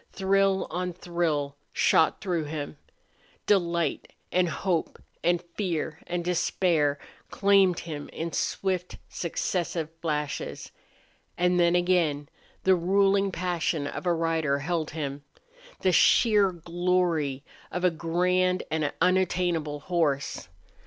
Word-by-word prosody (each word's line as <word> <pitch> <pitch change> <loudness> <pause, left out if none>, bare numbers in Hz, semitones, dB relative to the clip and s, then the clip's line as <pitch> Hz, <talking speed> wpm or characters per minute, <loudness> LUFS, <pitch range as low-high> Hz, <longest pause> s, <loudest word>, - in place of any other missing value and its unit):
Thrill 195 0 +2
on 180 0 -2
thrill 165 -5 -2
shot 160 - +3
through 175 -6 -1
him. 150 -1 -5 0.7
Delight 170 -6 +1 0.2
and 180 -1 +2
hope 175 0 -1 0.3
and 175 0 +3
fear 165 -5 -2
and 175 -1 -3
despair 165 -4 +1 0.3
claimed 195 -3 +3
him 150 -3 -7
in 165 0 -5
swift, 185 -2 -2
successive 170 -1 -2
flashes. 150 -3 -3 0.7
And 180 0 +2
then 170 0 +4
again 170 -5 +1 0.3
the 190 - +5
ruling 195 +2 +2
passion 170 -4 -1
of 145 - -5
a 175 - +4
rider 160 -3 0
held 160 +2 -2
him 145 -2 -5 0.6
the 185 - +3
sheer 205 0 +5
glory 170 -5 0 0.3
of 180 - -3
a 180 - +4
grand 180 +3 +1
and 155 -2 0
unattainable 175 -4 +1
horse. 150 - -1
175 Hz, 110 wpm, -27 LUFS, 155-185 Hz, 0.7 s, the